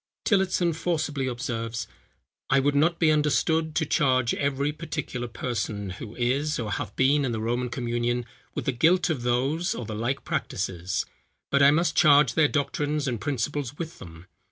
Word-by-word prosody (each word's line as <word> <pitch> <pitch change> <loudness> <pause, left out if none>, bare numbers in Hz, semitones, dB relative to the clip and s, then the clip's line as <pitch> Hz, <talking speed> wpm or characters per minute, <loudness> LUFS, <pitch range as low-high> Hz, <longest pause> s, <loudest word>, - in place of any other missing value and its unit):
Tillotson 185 -4 +2
forcibly 155 -4 -1
observes, 120 -2 -3 0.6
"I 135 - +4
would 140 +2 +2
not 165 +4 +3
be 160 -2 +4
understood 155 +1 +1
to 160 - +1
charge 130 -4 +2
every 140 +1 0
particular 150 -5 -5
person, 110 -4 -3
who 105 +4 -8
is, 135 +5 0
or 110 -3 -3
hath 105 -2 -4
been 140 +2 +3
in 125 -3 -1
the 110 - -2
Roman 120 +3 -1
communion, 120 0 -1 0.3
with - - -3
the - - +2
guilt 170 +8 +3
of 140 -6 -2
those 135 +9 0
or 120 - -5
the 110 - -5
like 120 +5 -2
practices; 95 -2 -2 0.5
but 140 - +3
I 140 - +8
must 165 +4 +2
charge 145 -5 +6
their 150 +1 +4
doctrines 145 0 -1
and 120 -4 -2
principles 145 0 -2
with 165 -1 -6
them. 80 -1 -11
135 Hz, 170 wpm, -26 LUFS, 120-150 Hz, 0.6 s, I